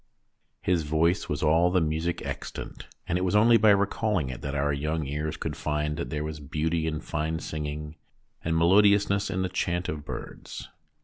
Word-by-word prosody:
His 90 Hz, -2 st, +2 dB
voice 80 Hz, +3 st, +1 dB
was 75 Hz, +1 st, -2 dB
all 80 Hz, +3 st, +4 dB
the 90 Hz, +1 st, +3 dB
music 80 Hz, +1 st, -1 dB
extant, -, -, -6 dB, 0.2 s
and 90 Hz, -, +1 dB
it -, -, -1 dB
was 95 Hz, +2 st, +1 dB
only 115 Hz, +2 st, +6 dB
by 110 Hz, 0 st, +5 dB
recalling 100 Hz, -, +2 dB
it 60 Hz, -, -8 dB
that 70 Hz, 0 st, -4 dB
our 75 Hz, 0 st, +1 dB
young 75 Hz, +2 st, -1 dB
ears 75 Hz, +3 st, -3 dB
could -, -, -4 dB
find 75 Hz, 0 st, -1 dB
that 85 Hz, -, -3 dB
there 75 Hz, -1 st, -2 dB
was 75 Hz, 0 st, -5 dB
beauty 80 Hz, +3 st, -1 dB
in 75 Hz, -1 st, -2 dB
fine 80 Hz, 0 st, -2 dB
singing 75 Hz, 0 st, -5 dB, 0.5 s
and 80 Hz, 0 st, 0 dB
melodiousness 100 Hz, +3 st, +4 dB
in 95 Hz, -1 st, -1 dB
the -, -, +1 dB
chaunt 90 Hz, -1 st, -1 dB
of 75 Hz, -1 st, -4 dB
birds. -, -, -7 dB
80 Hz, 185 wpm, -27 LUFS, 75-90 Hz, 0.5 s, only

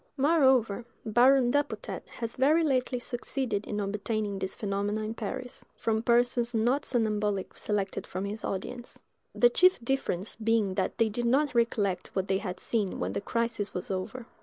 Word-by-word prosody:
Moreover, 265 Hz, -7 st, +3 dB, 0.2 s
Baron 245 Hz, +3 st, +5 dB
Dupotet 290 Hz, +1 st, -1 dB
has 230 Hz, -1 st, -5 dB
very 300 Hz, +6 st, +4 dB
lately 255 Hz, -3 st, +1 dB
succeeded 245 Hz, -3 st, -3 dB
in 210 Hz, -, -2 dB
obtaining 205 Hz, 0 st, -2 dB
these 190 Hz, 0 st, -3 dB
phenomena 205 Hz, +1 st, -2 dB
in 215 Hz, +1 st, -3 dB
Paris, 245 Hz, +3 st, -5 dB
from 220 Hz, -1 st, 0 dB
persons 240 Hz, 0 st, +2 dB
not 245 Hz, +6 st, +2 dB
somnambulic 210 Hz, -5 st, 0 dB
selected 200 Hz, -2 st, -2 dB
from 185 Hz, +2 st, -4 dB
his 210 Hz, +2 st, -5 dB
audience,—the 240 Hz, +3 st, -2 dB
chief 365 Hz, +7 st, +5 dB
difference 225 Hz, -7 st, -1 dB
being 220 Hz, -3 st, +1 dB
that 190 Hz, 0 st, -1 dB
they 230 Hz, -2 st, +3 dB
did 240 Hz, +3 st, -2 dB
not 275 Hz, +4 st, +2 dB
recollect 220 Hz, -5 st, +1 dB
what 190 Hz, 0 st, 0 dB
they 190 Hz, 0 st, +2 dB
had 185 Hz, -3 st, -5 dB
seen 210 Hz, -5 st, -1 dB
when 90 Hz, +2 st, -2 dB
the 100 Hz, -, -2 dB
crisis 230 Hz, -3 st, -2 dB
was 180 Hz, -, -4 dB
over. 195 Hz, +6 st, -4 dB
225 Hz, 160 wpm, -29 LUFS, 200-250 Hz, 0.2 s, Baron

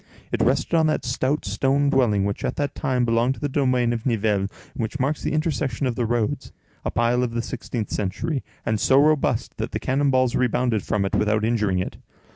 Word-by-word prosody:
It -, -, 0 dB
rested -, -, +1 dB
on 160 Hz, -1 st, +4 dB
that 155 Hz, -, 0 dB
stout 130 Hz, +4 st, -1 dB
stone 135 Hz, +8 st, +1 dB
dwelling 110 Hz, -8 st, +3 dB
which 100 Hz, 0 st, -3 dB
at -, -, -1 dB
that 145 Hz, -1 st, -2 dB
time 130 Hz, -4 st, 0 dB
belonged 120 Hz, +3 st, +2 dB
to -, -, -12 dB
the 145 Hz, -, -1 dB
domain 130 Hz, -4 st, +1 dB
of 115 Hz, -2 st, -4 dB
Nivelles, 105 Hz, -5 st, +1 dB, 0.2 s
and -, -, -4 dB
which 115 Hz, +5 st, -3 dB
marks 140 Hz, +4 st, 0 dB
the -, -, -2 dB
intersection 150 Hz, -5 st, -1 dB
of 125 Hz, -, 0 dB
the 115 Hz, 0 st, -1 dB
roads—a 115 Hz, -2 st, -3 dB
pile 120 Hz, +1 st, +1 dB
of 120 Hz, -2 st, -2 dB
the 120 Hz, -, +1 dB
sixteenth 120 Hz, -4 st, -4 dB
century, 115 Hz, -, -2 dB, 0.2 s
and 110 Hz, -2 st, 0 dB
so 135 Hz, +5 st, +4 dB
robust 150 Hz, 0 st, +2 dB
that -, -, -4 dB
the -, -, -1 dB
cannon 140 Hz, +2 st, +1 dB
balls 130 Hz, -2 st, +2 dB
rebounded 125 Hz, -3 st, +1 dB
from 100 Hz, 0 st, -1 dB
it 95 Hz, -, -3 dB
without 105 Hz, 0 st, +2 dB
injuring 105 Hz, -5 st, +1 dB
it. 90 Hz, -, -3 dB
125 Hz, 210 wpm, -23 LUFS, 110-135 Hz, 0.2 s, on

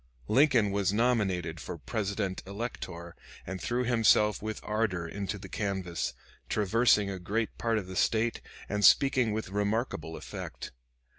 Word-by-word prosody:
Lincoln 130 Hz, -7 st, +4 dB
was 100 Hz, -1 st, +1 dB
nominated 100 Hz, -8 st, +1 dB
for 85 Hz, -, -6 dB
Presidential 100 Hz, 0 st, -3 dB
Elector 95 Hz, -6 st, -6 dB, 0.3 s
and 95 Hz, -1 st, -5 dB
threw 120 Hz, +1 st, 0 dB
himself 110 Hz, -3 st, +3 dB
with 110 Hz, 0 st, -4 dB
ardor 105 Hz, -6 st, -1 dB
into 100 Hz, +3 st, -4 dB
the 95 Hz, -1 st, -9 dB
canvass, 95 Hz, -4 st, -2 dB, 0.4 s
traversing 105 Hz, -1 st, +3 dB
a 95 Hz, -, -5 dB
great 105 Hz, +5 st, -2 dB
part 115 Hz, -1 st, +1 dB
of 105 Hz, -, -2 dB
the 95 Hz, 0 st, -8 dB
State 115 Hz, +4 st, +1 dB, 0.3 s
and 105 Hz, +1 st, -2 dB
speaking 130 Hz, -3 st, +5 dB
with 110 Hz, -2 st, -3 dB
remarkable 100 Hz, -5 st, -1 dB
effect. -, -, -7 dB
105 Hz, 140 wpm, -30 LUFS, 95-115 Hz, 0.4 s, speaking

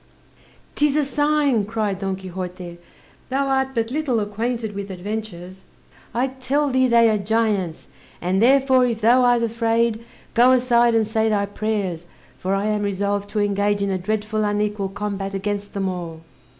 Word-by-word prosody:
"'Tis 295 Hz, -1 st, +2 dB
a 300 Hz, -2 st, +2 dB
sign," 290 Hz, -4 st, +1 dB
cried 210 Hz, -2 st, -2 dB
Don 195 Hz, -1 st, -2 dB
Quixote, 180 Hz, -2 st, -7 dB, 0.5 s
"thou 275 Hz, +2 st, 0 dB
art 265 Hz, 0 st, 0 dB
but 230 Hz, 0 st, -1 dB
little 275 Hz, -5 st, 0 dB
acquainted 220 Hz, +2 st, -3 dB
with 200 Hz, 0 st, -6 dB
adventures! 190 Hz, -1 st, -6 dB, 0.5 s
I 245 Hz, +3 st, 0 dB
tell 270 Hz, +2 st, -1 dB
thee, 260 Hz, 0 st, +3 dB
they 235 Hz, -1 st, +5 dB
are 215 Hz, -2 st, +2 dB
giants; 205 Hz, -5 st, -1 dB, 0.3 s
and 185 Hz, +3 st, 0 dB
therefore 260 Hz, +1 st, +4 dB
if 230 Hz, -2 st, -3 dB
thou 240 Hz, +4 st, +5 dB
art 245 Hz, -1 st, +3 dB
afraid, 230 Hz, 0 st, 0 dB, 0.3 s
go 245 Hz, +2 st, +5 dB
aside 240 Hz, -2 st, +3 dB
and 225 Hz, -1 st, +3 dB
say 220 Hz, +1 st, 0 dB
thy 205 Hz, -2 st, +1 dB
prayers, 200 Hz, -5 st, -3 dB, 0.3 s
for 190 Hz, +1 st, -1 dB
I 195 Hz, +1 st, -1 dB
am 210 Hz, -1 st, 0 dB
resolved 200 Hz, 0 st, -1 dB
to 210 Hz, +1 st, -2 dB
engage 205 Hz, 0 st, +1 dB
in 200 Hz, -, -1 dB
a 190 Hz, -, -1 dB
dreadful 215 Hz, +2 st, -2 dB
unequal 205 Hz, -1 st, -1 dB
combat 195 Hz, -1 st, -4 dB
against 205 Hz, +1 st, -3 dB
them 195 Hz, -1 st, -1 dB
all." 170 Hz, -3 st, -5 dB
215 Hz, 165 wpm, -22 LUFS, 195-240 Hz, 0.5 s, they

